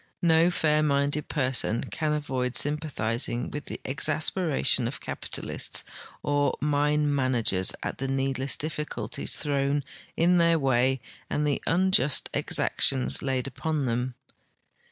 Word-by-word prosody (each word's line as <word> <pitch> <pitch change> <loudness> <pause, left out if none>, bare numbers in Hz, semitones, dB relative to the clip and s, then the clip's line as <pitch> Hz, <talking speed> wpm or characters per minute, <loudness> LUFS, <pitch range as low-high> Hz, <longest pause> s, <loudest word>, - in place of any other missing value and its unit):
No 165 0 +5
fair 155 -3 +2
minded 145 0 0
})erson 130 -5 +1
can 155 -2 -1
aA'oid 130 -3 -3
symj)atbizing 130 -6 -1
with 145 -1 -6
the - - -6
exasperation 150 -2 +1
of 120 -1 -6
capitalists - - -2 0.4
or 145 0 +1
mine 150 +1 +1
man 130 -2 +1
agers 95 -5 +3
at - - -4
the 135 - -2
needless 135 0 0
difliculties 150 -1 -3
thrown 140 -1 0 0.3
in 175 +2 +4
their 170 -1 +4
Avay 130 -2 +1 0.3
and 150 - 0
the 145 -2 0
unjust 165 -6 +2
exactions 130 -2 +2
laid 130 -2 -1
upon 140 +3 -2
them. 125 +1 -2
140 Hz, 125 wpm, -27 LUFS, 130-150 Hz, 0.4 s, No